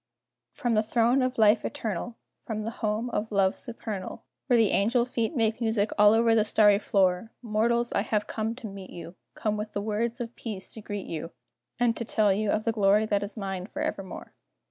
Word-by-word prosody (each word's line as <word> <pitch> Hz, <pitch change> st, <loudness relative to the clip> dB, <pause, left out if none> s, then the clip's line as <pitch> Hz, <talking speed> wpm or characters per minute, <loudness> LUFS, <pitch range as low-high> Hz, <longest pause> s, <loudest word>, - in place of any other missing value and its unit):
_ -, -, -36 dB
From 240 Hz, -1 st, 0 dB
the 215 Hz, -, +4 dB
throne 235 Hz, +4 st, +2 dB
of 255 Hz, 0 st, -1 dB
Life 215 Hz, 0 st, +5 dB
Eternal, 220 Hz, +2 st, -4 dB, 0.3 s
From 215 Hz, -1 st, -4 dB
the 225 Hz, -, -3 dB
home 225 Hz, +1 st, -2 dB
of 215 Hz, +2 st, -2 dB
love 195 Hz, -2 st, +2 dB
supernal, 220 Hz, -5 st, -6 dB, 0.2 s
Where 245 Hz, -3 st, +4 dB
the 220 Hz, -4 st, +4 dB
angel 235 Hz, +4 st, +2 dB
feet 240 Hz, +3 st, -2 dB
make 225 Hz, -1 st, +1 dB
music 220 Hz, -2 st, +1 dB
over 220 Hz, +3 st, +6 dB
all 225 Hz, -, +5 dB
the 220 Hz, -, +4 dB
starry 210 Hz, -1 st, +5 dB
floor 190 Hz, +1 st, +1 dB
Mortals, 235 Hz, +2 st, +1 dB
I -, -, +2 dB
have 210 Hz, 0 st, -1 dB
come 220 Hz, +2 st, -3 dB
to 245 Hz, -3 st, -7 dB
meet 195 Hz, -2 st, -9 dB
you, 170 Hz, 0 st, -9 dB, 0.2 s
Come 215 Hz, -1 st, -1 dB
with 210 Hz, +1 st, -6 dB
words 220 Hz, +3 st, -1 dB
of 235 Hz, 0 st, -5 dB
peace 210 Hz, -5 st, -6 dB
to 220 Hz, -, -8 dB
greet 205 Hz, -1 st, -5 dB
you, 165 Hz, 0 st, -5 dB, 0.5 s
And 240 Hz, -1 st, +2 dB
to -, -, -2 dB
tell 215 Hz, -3 st, +2 dB
you 210 Hz, +1 st, -1 dB
of 215 Hz, -, +1 dB
the 230 Hz, -, +1 dB
glory 210 Hz, 0 st, +3 dB
that 205 Hz, -2 st, 0 dB
is 205 Hz, +2 st, -6 dB
mine 195 Hz, -2 st, -4 dB
forevermore. 290 Hz, -9 st, -5 dB
215 Hz, 205 wpm, -27 LUFS, 205-230 Hz, 0.5 s, over